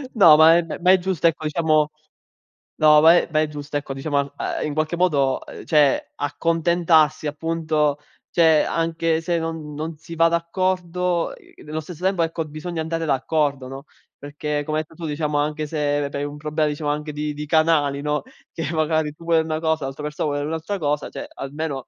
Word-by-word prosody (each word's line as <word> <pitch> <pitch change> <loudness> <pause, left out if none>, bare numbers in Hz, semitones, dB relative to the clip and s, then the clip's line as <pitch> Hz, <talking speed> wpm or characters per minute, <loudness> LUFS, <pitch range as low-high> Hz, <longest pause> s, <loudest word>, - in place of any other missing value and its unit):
No, 165 -8 +8
ma 160 +1 +7
è - - +4
ehm, 165 - -4
ma 185 +1 +5
è 190 - +6
giusto, 175 -2 +1
ecco, 160 -1 -1
diciamo 155 -1 +2 0.8
no, 150 -1 +6
ma 165 +2 +7
è - - +2
ma 155 0 +2
è 155 - +1
giusto, 145 0 -5
ecco, 140 -1 -5
diciamo, 145 +2 -2
a 140 0 -3
ahm, - - -2
in 150 - -3
qualche 155 +2 -1
modo, 140 -7 +2
uhm, - - -10
cioè, 150 -4 +2
accontentarsi, 160 +1 +2
appunto. 155 -1 0 0.3
Cioè, 160 -3 +4
anche 165 0 0
se 170 0 -1
non 160 -2 -5
non 155 +1 -5
si 165 +2 -10
va 165 +1 +5
d'accordo, 180 0 -1
uhm, - - -18
nello 155 +1 -4
stesso 175 +2 -10
tempo, 190 -3 +2
ecco, 165 0 -2
bisogna 160 +2 -5
andare 165 0 -2
d'accordo, 140 -1 0
no, 135 +2 -8 0.3
perché, 145 +1 -4
come 155 0 -1
hai - - -2
detto - - -19
tu, 160 - -3
diciamo, 150 0 -1
anche 150 +1 -2
se 145 -2 -1
hai 140 - -3
un 145 0 -7
problema, 150 0 -1
diciamo, 150 0 -3
anche 150 +1 -4
di 150 0 -3
di 150 +1 -6
canali, 150 -3 +2
no, 150 0 -1 0.3
che 160 -1 -3
magari, 155 -1 0
tu 165 - -16
vuoi 165 -1 +3
una 160 0 -2
cosa, 160 -3 0
l'altra 135 +2 -6
persona 150 0 -2
vuole 145 0 -2
un'altra 160 +6 -3
cosa, 150 -3 -1
cioè, - - -7
almeno 140 -1 -5
155 Hz, 200 wpm, -22 LUFS, 150-165 Hz, 0.8 s, No